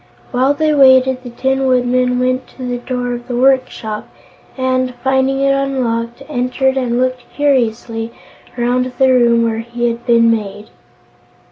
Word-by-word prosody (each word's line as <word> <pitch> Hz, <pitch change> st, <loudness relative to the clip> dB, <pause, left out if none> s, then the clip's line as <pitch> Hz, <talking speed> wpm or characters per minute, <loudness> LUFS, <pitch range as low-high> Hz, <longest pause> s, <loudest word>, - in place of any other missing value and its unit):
While 265 Hz, +3 st, +2 dB
they 310 Hz, +1 st, +1 dB
waited, 260 Hz, -2 st, +5 dB
the 250 Hz, -, -9 dB
Tin 265 Hz, +2 st, -1 dB
Woodman 250 Hz, 0 st, +1 dB
went 255 Hz, +1 st, -1 dB
to 260 Hz, -, -7 dB
the 245 Hz, 0 st, -3 dB
door 245 Hz, 0 st, -3 dB
of 240 Hz, 0 st, -7 dB
the 245 Hz, -, -3 dB
workshop 250 Hz, -4 st, 0 dB, 0.5 s
and, 255 Hz, -1 st, -1 dB
finding 265 Hz, 0 st, +1 dB
it 275 Hz, 0 st, +3 dB
unlocked, 255 Hz, -3 st, -2 dB
entered 265 Hz, -1 st, 0 dB
and 245 Hz, -2 st, -1 dB
looked 255 Hz, -1 st, -2 dB
curiously 230 Hz, -5 st, 0 dB, 0.5 s
around 250 Hz, +1 st, 0 dB
the 265 Hz, -1 st, +4 dB
room 235 Hz, -2 st, +3 dB
where 225 Hz, -1 st, -1 dB
he 240 Hz, +1 st, -3 dB
had 235 Hz, 0 st, -5 dB
been 230 Hz, -1 st, +4 dB
made. 210 Hz, -1 st, -4 dB
250 Hz, 150 wpm, -16 LUFS, 240-265 Hz, 0.5 s, waited